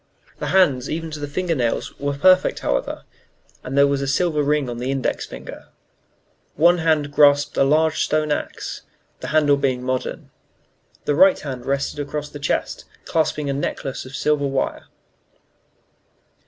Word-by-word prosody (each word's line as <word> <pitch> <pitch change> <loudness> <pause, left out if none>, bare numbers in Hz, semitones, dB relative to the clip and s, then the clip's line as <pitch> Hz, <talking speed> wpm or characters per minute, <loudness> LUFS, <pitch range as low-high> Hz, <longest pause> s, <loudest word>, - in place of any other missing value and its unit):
The - - -3
hands, 145 -9 +3
even 160 0 -4
to 150 - -6
the 145 - -4
finger 170 +4 -1
nails, 120 -6 -1
were 140 0 -2
perfect, 185 +4 +4
however, - - -2 0.6
and 135 +2 -4
there 140 - +7
was 140 -1 0
a 140 - -2
silver 150 +2 +1
ring 145 -1 +1
on 120 -1 -5
the 125 +2 -3
index 135 -1 -2
finger. - - -10 0.9
One 170 +3 +4
hand 155 -3 +1
grasped 145 0 +4
a - - +3
large 155 +3 +2
stone 155 0 0
axe - - -4 0.4
the - - -6
handle 150 -2 +3
being 130 -3 -1
modern. 130 0 -3 0.7
The 145 - +1
right 190 +6 +5
hand 130 -4 -7
rested 140 +2 -1
across 145 +1 -4
the 145 - -9
chest, 145 - -2 0.2
clasping 155 -2 0
a 140 - 0
necklace 135 -1 -4
of 130 +1 -10
silver 150 -2 +1
wire. 135 -1 -2
145 Hz, 160 wpm, -21 LUFS, 135-155 Hz, 0.9 s, there